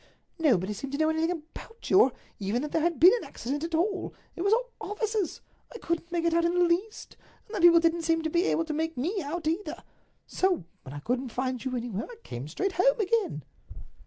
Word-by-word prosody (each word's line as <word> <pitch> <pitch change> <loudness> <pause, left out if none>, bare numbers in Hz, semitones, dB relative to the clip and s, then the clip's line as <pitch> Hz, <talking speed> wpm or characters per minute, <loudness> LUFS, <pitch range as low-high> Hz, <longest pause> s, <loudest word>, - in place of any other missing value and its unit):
Nobody 210 - +2
seemed 270 +7 -7
to - - -1
know 315 +1 +3
anything 320 +1 0
about 355 +7 -7
you, 380 - +8
or 260 - +4 0.3
even 210 +6 -1
that 300 - -4
there 325 - +1
had 340 0 0
been 360 +4 +9
an - - -6
accident 285 +5 -4
at 330 0 -2
all—it 375 0 -3
was 400 +2 +2
all - - +2
offices. 425 -3 -2 0.3
I 475 - -8
couldn't 335 -4 -3
make 340 -1 0
it 335 - +2
out 335 0 +3
in 340 +1 +1
the 355 - +4
least, 360 +6 -1 0.3
and 435 - -14
the 390 - -1
people 340 -1 +8
didn't 335 0 +2
seem 325 0 +1
to 320 - 0
be 345 +3 +2
able 330 - +1
to 315 - -3
make 320 -1 -2
me 360 - -1
out 315 +3 -4
either. 330 +6 -2 0.4
So 370 - +1 0.2
when 130 - -10
I 145 - -6
couldn't 250 - -1
find 255 0 -2
you 255 -1 -2
anywhere 230 -4 -4
I - - -10
came 125 +4 -6
straight 375 - -1
home - - +3
again." 415 - 0
330 Hz, 225 wpm, -28 LUFS, 270-370 Hz, 0.4 s, been